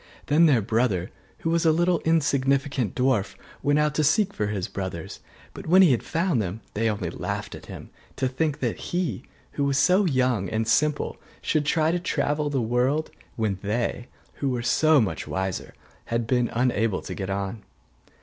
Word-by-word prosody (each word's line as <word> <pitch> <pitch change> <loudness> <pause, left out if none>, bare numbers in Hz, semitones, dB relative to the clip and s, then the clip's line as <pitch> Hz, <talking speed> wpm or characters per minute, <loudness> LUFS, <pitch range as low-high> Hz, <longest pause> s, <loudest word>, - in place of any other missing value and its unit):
Then 160 +3 +5
their 125 -8 +3
brother, 110 -5 0 0.3
who 165 - 0
was 170 0 +2
a 160 - +5
little 175 +1 +2
insignificant 140 - +1
dwarf, 125 -6 +1 0.3
went 145 +1 +2
out 150 -1 +2
to 155 - +1
seek 200 +7 +2
for 105 - -1
his 100 -3 -2
brothers: 95 -4 -6 0.3
but - - -9
when 185 +4 +7
he 170 - +6
had 120 - +2
found 165 - 0
them 100 +3 -4
they 115 +2 +1
only 105 - -3
laughed - - -4
at - - -10
him, - - -10 0.2
to 130 - 0
think 150 +3 -1
that - - -1
he, 175 - -1 0.3
who 145 - -2
was 140 -1 +1
so 185 +7 +4
young 125 - +1
and 110 0 -1
simple, 150 +4 +1 0.2
should 150 -2 0
try 160 0 +2
to 175 - 0
travel 145 -2 -1
through 140 -2 0
the - - -1
world, 125 +7 0 0.2
when 105 -4 -1
they, 120 +3 -2 0.3
who 140 - -1
were 125 -2 -2
so 155 +4 +4
much 110 -6 -1
wiser, 95 -1 -3 0.3
had 115 0 -1
been 125 0 +1
unable 115 -4 0
to - - -6
get 95 -1 -5
on. 100 +2 -3
130 Hz, 190 wpm, -25 LUFS, 110-155 Hz, 0.3 s, when